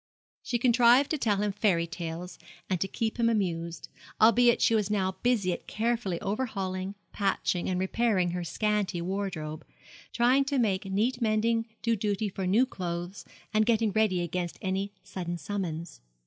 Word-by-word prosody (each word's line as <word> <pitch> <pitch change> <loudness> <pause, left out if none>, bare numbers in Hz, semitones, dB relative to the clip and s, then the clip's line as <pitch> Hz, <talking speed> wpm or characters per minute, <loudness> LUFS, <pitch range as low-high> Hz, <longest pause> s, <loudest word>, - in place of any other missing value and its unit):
She 240 - -1
contrived 245 +2 +5
to 310 - 0
tell 210 -5 +1
him 210 - 0
fairy 195 -4 +2
tales, 170 +1 -6 0.3
and 185 - 0
to 195 - +1
keep 220 +4 -3
him 230 0 +4
amused; 170 -6 -2 0.3
albeit 235 +2 +5
she - - +3
was 210 -3 +1
now 190 -3 +1
busy 220 -7 +2
at - - -8
carefully 220 -5 -1
overhauling, 195 -3 -3 0.2
patching, 195 -3 0
and 180 -1 0
repairing 190 -2 +1
her 175 0 -3
scanty 210 +1 -1
wardrobe 170 -4 -4 0.5
trying 250 +3 +4
to 275 0 -1
make 205 -6 +1
neat 225 +6 0
mending 225 +1 +1 0.2
do 230 0 +2
duty 205 0 -1
for 190 -1 -4
new 220 +8 +4
clothes, 175 -4 -5 0.3
and 215 +1 +3
getting 225 -2 +3
ready 200 -4 +2
against 175 0 -3
any 195 +1 -2
sudden 180 -2 -5
summons. 170 - -5
200 Hz, 160 wpm, -28 LUFS, 180-230 Hz, 0.5 s, contrived